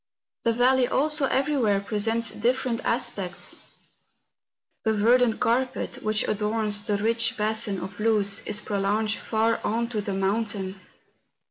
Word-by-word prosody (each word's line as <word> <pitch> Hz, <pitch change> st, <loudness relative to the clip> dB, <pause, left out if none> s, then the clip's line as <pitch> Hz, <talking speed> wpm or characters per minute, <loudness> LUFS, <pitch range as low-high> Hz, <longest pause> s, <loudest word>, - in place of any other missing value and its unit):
The 230 Hz, -, +2 dB
valley 250 Hz, +2 st, +4 dB
also 300 Hz, +1 st, +2 dB
everywhere 265 Hz, -8 st, +2 dB
presents 225 Hz, +3 st, 0 dB
different 240 Hz, +1 st, -1 dB
aspects. 210 Hz, -6 st, -2 dB, 1.3 s
The 220 Hz, -, +2 dB
verdant 230 Hz, +2 st, +3 dB
carpet, 255 Hz, +2 st, -1 dB
which 215 Hz, 0 st, 0 dB
adorns 210 Hz, 0 st, 0 dB
the 205 Hz, -1 st, -1 dB
rich 230 Hz, +3 st, +1 dB
basin 210 Hz, -2 st, -1 dB
of 190 Hz, +3 st, -8 dB
Luz, 210 Hz, -2 st, +2 dB
is 210 Hz, 0 st, -3 dB
prolonged 210 Hz, +2 st, 0 dB
far 225 Hz, +1 st, 0 dB
on 230 Hz, +2 st, -1 dB
to 220 Hz, -3 st, -2 dB
the 200 Hz, -1 st, -3 dB
mountain. 195 Hz, -1 st, -1 dB
220 Hz, 125 wpm, -26 LUFS, 205-235 Hz, 1.3 s, valley